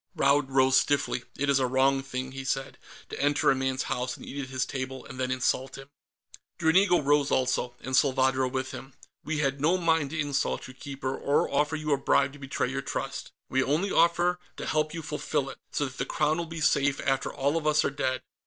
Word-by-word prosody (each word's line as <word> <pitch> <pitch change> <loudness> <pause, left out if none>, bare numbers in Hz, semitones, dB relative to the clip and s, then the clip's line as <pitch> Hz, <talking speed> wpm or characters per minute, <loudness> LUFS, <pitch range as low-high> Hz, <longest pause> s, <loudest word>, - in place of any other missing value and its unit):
Raud 140 0 +3
rose 130 0 +5
stiffly. 140 -3 -1
"It 145 - 0
is 140 -1 +3
a 130 - +2
wrong 135 +1 +2
thing," 130 -1 -5
he 135 0 -6
said, 135 0 -3 0.3
"to - - -5
enter 145 0 +3
a - - +2
man's 130 0 -1
house 125 +1 -3
and - - -11
eat 140 - -5
at 130 - -7
his 130 -1 -1
table, 130 -1 -5
and 130 - -10
then 130 0 0
insult 130 +1 -1
him." 135 +1 -12 0.7
Dranigo 175 +3 +4
rose 145 -1 +2
also, 125 -1 0
and 130 0 -2
Salvadro 130 -1 +3
with 130 0 -3
him. 135 0 -9 0.3
"We 155 0 -2
had 140 -1 -1
no 165 +5 +3
mind 165 -4 +1
to 155 +2 -4
insult 145 -2 -1
you, 130 - -11
Keeper, 135 0 -5
or 140 - +1
offer 150 +3 +1
you 155 -1 -1
a - - +2
bribe 140 0 +2
to 145 - -13
betray 135 -2 -2
your 135 0 -2
trust. - - -4 0.2
We 130 - +1
only 160 +9 0
offer 175 +1 +3 0.2
to - - -5
help 155 0 0
you 165 -1 -6
fulfill 145 -2 -2
it, - - -13
so 145 - 0
that 130 -2 -8
the 125 - 0
Crown 155 +2 +1
will 170 - -3
be 165 0 -6
safe 140 -1 +2
after 135 -1 0
all 140 +3 0
of 160 -2 -1
us 150 0 +3
are - - 0
dead. 130 -2 -2
135 Hz, 225 wpm, -28 LUFS, 130-150 Hz, 0.7 s, rose